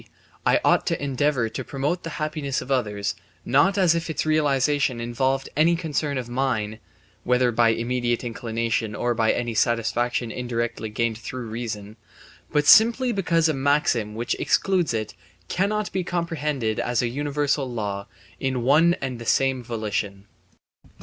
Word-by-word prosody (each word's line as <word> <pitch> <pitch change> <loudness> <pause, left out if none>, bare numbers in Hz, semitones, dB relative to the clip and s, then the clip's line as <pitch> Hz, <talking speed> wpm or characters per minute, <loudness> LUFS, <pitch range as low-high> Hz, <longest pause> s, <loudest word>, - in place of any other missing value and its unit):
I - - +4
ought - - +3
to - - 0
endeavour 140 -3 0
to 110 - -5
promote 145 +6 -2
the 165 - -6
happiness 150 -3 -2
of 135 - -7
others, 105 -6 0 0.3
not 190 +10 +3
as 180 -4 +4
if 165 0 -2
its 160 - -2
realization 145 -3 +2
involved 130 +3 -1
any 160 +4 +4
concern 150 -4 -2
of 125 -2 -4
mine 120 -4 -1 0.4
(whether 125 0 +2
by 115 0 +4
immediate 120 +1 0
inclination 115 -2 -2
or 120 +2 0
by 115 -1 +2
any 120 -1 -2
satisfaction 120 +1 0
indirectly 120 -2 -3
gained 115 +1 -1
through 125 +1 -6
reason), 110 -2 -6 0.5
but 150 -1 +2
simply 235 - +6
because 170 -6 +2
a 155 - +1
maxim 135 -6 +1
which 115 +2 -1
excludes 185 -4 +1
it 110 -2 -3 0.4
cannot 210 +3 0
be 185 - -1
comprehended 150 - -2
as 120 0 0
a - - +1
universal 145 +1 -1
law 100 -4 -4 0.3
in 130 -3 -1
one 160 +7 +5
and 130 -3 -3
the 115 - -8
same 135 -2 +2
volition. 105 -4 -3
130 Hz, 150 wpm, -24 LUFS, 115-150 Hz, 0.5 s, simply